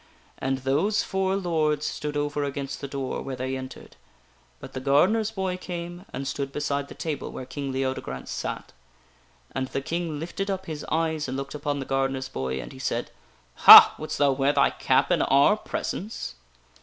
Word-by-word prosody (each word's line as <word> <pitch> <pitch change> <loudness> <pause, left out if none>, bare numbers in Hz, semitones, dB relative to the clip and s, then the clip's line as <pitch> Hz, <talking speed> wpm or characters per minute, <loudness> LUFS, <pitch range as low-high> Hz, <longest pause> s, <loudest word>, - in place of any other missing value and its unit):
And 135 0 -1
those 145 +11 +1
four 190 0 0
lords 155 -5 0
stood 150 -1 -3
over 145 0 -1
against 140 -1 -4
the 140 - -4
door, 135 -1 -4
where 135 - -5
they 130 +1 -3
entered; 130 0 -9 0.6
but 135 - -11
the 130 - -4
gardener's 180 +12 +3
boy 190 -4 -3
came 175 0 -7
and 135 +1 -5
stood 135 0 -3
beside 140 -1 -2
the - - -11
table 155 -4 -4
where 130 - -7
King 140 0 -5
Leodegrance 130 - -3
sat. - - -5 0.8
And 130 0 -2
the 135 - -3
King 165 0 -3
lifted 185 +5 -4
up 190 -1 -3
his 155 -2 -6
eyes 160 -2 0
and 130 +1 -3
looked 135 0 -5
upon 145 -1 -2
the 135 - -4
gardener's 135 0 -1
boy, 65 - -3
and - - -7
he 130 - -12
said: 120 -2 -2 0.6
"Ha! - - +13
Wouldst 155 - -4
thou 145 -1 +4
wear 135 +1 +1
thy 140 -1 +3
cap - - +1
in - - +3
our 140 +9 +4
presence 215 0 -5
145 Hz, 180 wpm, -26 LUFS, 135-165 Hz, 0.8 s, Ha